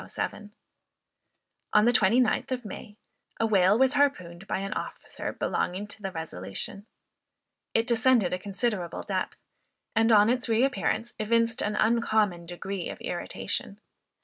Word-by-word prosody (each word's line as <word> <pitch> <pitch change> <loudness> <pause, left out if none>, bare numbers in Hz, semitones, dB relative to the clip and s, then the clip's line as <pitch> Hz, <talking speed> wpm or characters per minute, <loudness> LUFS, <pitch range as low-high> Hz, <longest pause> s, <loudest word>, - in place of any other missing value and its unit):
On 210 +1 +6
the 240 - +5
29th 240 +3 +3
of 250 -2 -2
May, 210 +1 -9 0.4
a 225 - +2
whale 200 -1 +4
was 265 +2 +4
harpooned 195 -11 0
by - - -1
an 195 +2 -3
officer - - -5
belonging 185 +3 -2
to 210 +1 -10
the 195 -1 -4
Resolution. 160 - -6 0.9
It 225 - +3
descended 235 -5 +3
a 180 - -1
considerable 200 -2 -2
depth; - - -3 0.6
and, 225 +1 +4
on 210 +1 +6
its 250 -1 -1
re 225 +2 +3
appearance, 240 -4 -1
evinced 230 +1 +1
an 210 0 -1
uncommon 215 -6 +2
degree 180 +1 -5
of - - -7
irritation. - - -4
215 Hz, 135 wpm, -27 LUFS, 190-235 Hz, 0.9 s, On